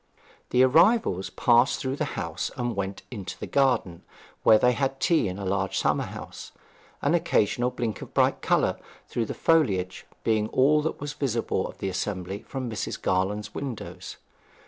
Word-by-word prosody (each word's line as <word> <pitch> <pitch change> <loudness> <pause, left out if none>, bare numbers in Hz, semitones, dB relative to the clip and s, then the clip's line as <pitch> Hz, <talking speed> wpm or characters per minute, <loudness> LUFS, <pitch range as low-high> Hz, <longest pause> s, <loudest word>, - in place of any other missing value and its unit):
The 125 +1 +4
arrivals 155 - +4
passed 120 +2 +3
through 130 +1 -2
the 150 -2 -3
house 85 -4 -3
and 120 -2 -2
went 100 0 -4
into 100 -6 -6
the - - -5
garden, 130 -11 +1 0.4
where 110 - +7
they 125 +3 +4
had 135 +1 -1
tea 165 - +2
in 90 0 -4
a 100 - -5
large 95 0 -1
summer - - +1
house, - - -9 0.5
an 145 - +2
occasional 120 -7 +2
blink 120 -3 -3
of - - -9
bright - - +3
colour, - - +1 0.3
through 115 - -1
the - - -5
foliage, 95 - +1 0.2
being 110 -1 +1
all 145 +6 +3
that 160 - -3
was 145 0 -5
visible 120 -9 -1
of - - -11
the 95 - -3
assembly 95 +1 -3
from 130 -2 -4
Mrs. 110 -4 -4
Garland's 95 +3 -1
windows. 130 -6 -6
115 Hz, 170 wpm, -26 LUFS, 95-135 Hz, 0.5 s, where